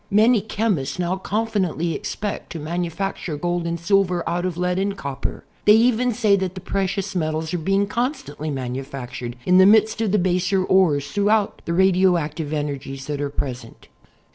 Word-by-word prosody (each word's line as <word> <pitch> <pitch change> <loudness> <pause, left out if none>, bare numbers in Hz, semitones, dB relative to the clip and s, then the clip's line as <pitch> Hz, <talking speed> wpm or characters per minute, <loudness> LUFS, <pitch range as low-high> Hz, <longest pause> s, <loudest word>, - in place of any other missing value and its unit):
Many 215 +2 +4
chemists 205 -10 -1
now 180 +1 0
confidently 190 -6 -1
ex - - -4
pect 205 0 -5
to 165 - -5
manufacture 170 +1 -3
gold 175 +1 -1
and 170 0 -2
silver 180 0 +1
out 175 +2 -1
of 180 -2 -3
lead 180 +1 0
and 200 +1 -1
copper. 140 -4 -5 0.2
They 210 - +8
even 245 +2 +3
say 215 -3 +3
that 190 -1 -3
the - - -5
precious 195 +1 -2
metals 160 -2 -2
are 175 - 0
being 195 +5 +1
constantly 230 - -3
manufactured 130 -2 -5
in 180 +1 +5
the 190 - +8
midst 220 +1 +4
of 215 -4 +1
the 210 - +3
baser 185 +1 +1
ores 170 -7 +3
throughout 205 0 +1
the 170 - -2
radioactive 175 -4 +2
energies 140 -3 -4
that 145 0 -3
are 145 - -1
present. 125 -5 -6
180 Hz, 170 wpm, -22 LUFS, 155-200 Hz, 0.2 s, They